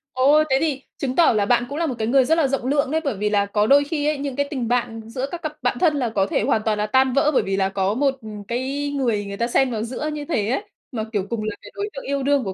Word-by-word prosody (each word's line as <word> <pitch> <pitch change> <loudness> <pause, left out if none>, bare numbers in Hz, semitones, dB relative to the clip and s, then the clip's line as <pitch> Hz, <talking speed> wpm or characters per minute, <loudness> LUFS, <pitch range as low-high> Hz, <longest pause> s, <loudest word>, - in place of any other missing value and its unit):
Ồ, 290 +4 +5
thế 265 - +4
thì 290 -4 -1 0.2
chứng 260 -2 -2
tỏ 335 -7 +5
là 210 -2 +2
bạn 245 +2 +2
cũng 285 - -5
là 335 - 0
một 260 -5 -2
cái 220 - -1
người 265 +1 +4
rất 320 +5 +2
là 310 - +3
rộng 265 -2 -2
lượng 280 0 +1
đấy, 320 +1 +1
bởi 275 -7 -1
vì 210 +1 0
là 200 -1 +2
có 210 +1 +1
đôi 285 +1 +6
khi 295 0 -2
ấy, 300 -1 +1
những 275 -2 -4
cái 285 0 0
tình 255 -6 -3
bạn 235 -2 -1
giữa 260 +3 -3
các 345 - -5
cặp 310 -1 -4
bạn 250 -1 0
thân 315 -4 +3
là 245 -4 0
có 200 -3 +1
thể - - 0
hoàn 220 - +2
toàn 215 -1 +1
là 210 - 0
tan 260 +2 +3
vỡ, 285 +3 +3
bởi - - +3
vì 195 0 -1
là 190 0 +1
có 195 +1 0
một, 270 +2 +1
ừm, 210 -2 -8
cái 270 +6 -3
người 230 -7 0
người 200 0 -6
ta 235 - 0
xen 255 +1 +2
vào 220 -1 -2
giữa 260 +6 -4
như 295 -1 -5
thế 220 -10 -1
ấy, 270 - 0 0.3
mà, 225 -4 -3
kiểu, 200 -2 -1
cùng 230 -2 -2
là 215 -1 -3
cái 205 - -12
đối 410 +1 -3
tượng - - -8
yêu 280 -1 -1
đương 280 -2 +2
của 190 - -4
255 Hz, 320 wpm, -22 LUFS, 215-285 Hz, 0.3 s, đôi